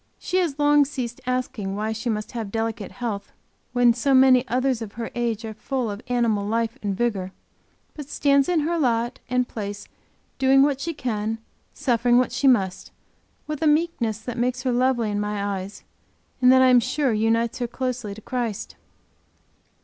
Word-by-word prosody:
She 365 - -2
has 335 -7 0
long 295 0 +5
ceased 255 -4 -5
asking 240 -6 -2
why 215 +2 -2
she 220 +2 -3
must 215 0 -3
have 225 -5 -5
delicate 225 -1 -3
health 215 -5 -4 0.4
when 245 -1 +4
so 265 +3 +2
many 260 -1 +6
others 255 -1 0
of 210 -3 -6
her 230 0 -5
age 235 -2 -2
are 220 - -5
full 240 +1 -3
of 200 +2 -7
animal 235 -4 +1
life 225 +2 -1
and 200 -2 -2
vigor 200 -6 -1 0.6
but 295 -2 -9
stands 280 0 +2
in 345 -3 +2
her 335 +3 0
lot 240 -4 0
and 250 0 +1
place 205 -2 -6 0.5
doing 270 0 +5
what 280 -1 +1
she 335 +1 -3
can, 220 -4 -2 0.4
suffering 245 -3 +2
what 255 - +2
she 280 - +1
must, 195 -8 +2 0.6
with 305 -1 -5
a 315 - +3
meekness 300 -8 +1
that 235 +2 -6
makes 250 +1 -1
her 255 - +1
lovely 245 -3 +1
in 205 - -1
my 205 -1 -2
eyes, 190 +2 -9 0.6
and 250 0 +7
that 260 0 +6
I 260 - +6
am 250 -1 +7
sure 265 +1 0
unites 225 +2 +1
her 240 - -1
closely 245 -4 -4
to 220 - -11
Christ. 235 -3 -4
240 Hz, 180 wpm, -24 LUFS, 220-260 Hz, 0.6 s, and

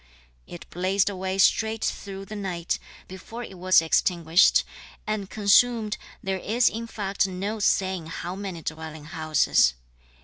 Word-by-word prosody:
It 175 - -10
blazed 190 +3 +1
away 190 0 -3
straight 220 +3 +2
through 195 -1 -5
the 215 - -8
night, 180 -4 -3 0.3
before 220 +6 -8
it 190 -5 -10
was 185 -2 +5
extinguished, 170 +1 +3 0.4
and 210 -2 -3
consumed, 215 +1 +3 0.2
there 190 -1 -2
is 235 +6 +2
in 230 +1 -6
fact 195 -3 -1
no 195 +4 -4
saying 190 -4 +1
how 175 +2 -5
many 190 -4 -6
dwelling 160 -1 -6
houses. 155 - +2
190 Hz, 135 wpm, -25 LUFS, 175-210 Hz, 0.4 s, was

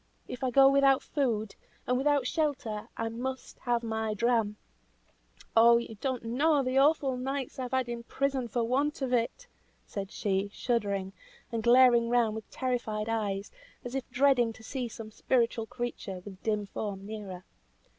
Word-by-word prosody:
If 250 - -7
I 260 - +2
go 270 +2 +7
without 275 -1 +4
food, 225 -7 -1 0.3
and 250 - +1
without 280 0 +2
shelter, 275 -8 -2
I 225 - -1
must 255 +3 -5
have 240 -1 0
my 220 -1 -2
dram. 225 -2 +1 1.0
Oh! 235 +1 +7
you 235 -1 -4
don't 260 -3 -2
know 280 +5 +2
the 255 +1 +2
awful 280 -2 +3
nights 265 +1 -4
I - - -1
have 250 - -4
had 260 -1 +1
in 235 0 -4
prison 265 +1 -1
for 235 +1 -1
want 275 +5 0
of 255 -1 -1
it!" 245 - 0 0.4
said 195 -2 -5
she, 195 0 -1
shuddering, 200 -5 -1 0.4
and 230 -1 -1
glaring 240 0 +6
round 235 -3 +3
with 220 0 -7
terrified 230 -4 -2
eyes, 205 -3 -2 0.3
as 245 - -5
if 270 -1 -3
dreading 250 -3 +3
to 220 - -15
see 255 +1 -3
some 220 -1 -9
spiritual 230 -1 0
creature, 230 -6 -5
with 195 -2 -10
dim 210 -2 0
form, 195 -1 -5
near 210 -1 -6
her. 185 -1 -8
235 Hz, 170 wpm, -30 LUFS, 220-260 Hz, 1.0 s, go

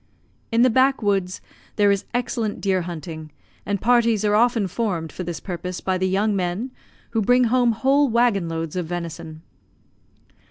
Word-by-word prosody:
In 230 +1 +4
the 255 - +4
back 260 +1 +3
woods 195 -3 0 0.3
there 205 -1 +4
is 200 -1 -1
excellent 235 -3 -2
deer 190 -2 +1
hunting, 160 -2 -7 0.4
and 200 -1 -1
parties 230 -2 +2
are 205 - +2
often 230 -1 +3
formed 180 -5 -2
for - - -7
this 175 -1 -5
purpose 180 0 -5
by 185 -1 -1
the 185 0 +1
young 205 +2 +1
men, 190 +7 -2 0.4
who 225 -1 0
bring 245 +4 +4
home 245 0 +3
whole 275 +5 +2
waggon 230 -7 +2
loads 165 -1 -4
of 180 -3 -2
venison. 165 -2 -6
200 Hz, 165 wpm, -22 LUFS, 175-235 Hz, 0.4 s, In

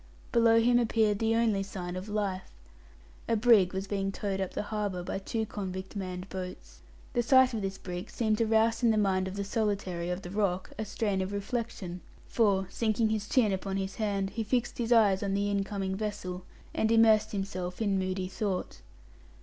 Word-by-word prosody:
Below 230 -1 +5
him 240 +1 +4
appeared 220 -3 +2
the 225 0 +2
only 225 -4 +2
sign 185 -2 -5
of 185 +3 -6
life. 200 -3 -2 0.8
A 230 - +3
brig 215 -5 +5
was 190 0 -3
being 195 -1 -1
towed 195 -1 -3
up 190 - -4
the - - -1
harbour 205 -4 -3
by 185 - -3
two 220 +3 -2
convict 190 -2 -6
manned 185 -1 -5
boats. 180 - -8 0.3
The 240 - +2
sight 260 +1 +5
of 220 - -2
this 195 0 -3
brig 180 -1 -6
seemed 215 -2 0
to 230 - +2
rouse 225 +1 +3
in 235 - +4
the 220 - +3
mind 190 -2 +2
of 190 - -6
the 200 - -2
solitary 200 -5 -1
of 180 +2 -3
the 175 - -7
rock 195 -3 -1
a 220 - -1
strain 205 -2 -1
of 190 +1 -3
reflection, 200 -3 -4 0.2
for, 200 -4 +2
sinking 220 0 +1
his 215 -1 -2
chin 230 -6 +3
upon 195 0 -2
his 195 0 -3
hand, 200 -3 -1
he 225 - -2
fixed 240 +3 -1
his 235 0 -1
eyes 210 -5 +5
on 195 -1 -1
the 205 +1 0
incoming 195 -1 -1
vessel, 195 -3 -4 0.3
and 220 - +1
immersed 220 -2 +5
himself 185 -3 -4
in 200 -3 +1
moody 185 0 -2
thought. 190 0 -3
200 Hz, 195 wpm, -30 LUFS, 190-220 Hz, 0.8 s, Below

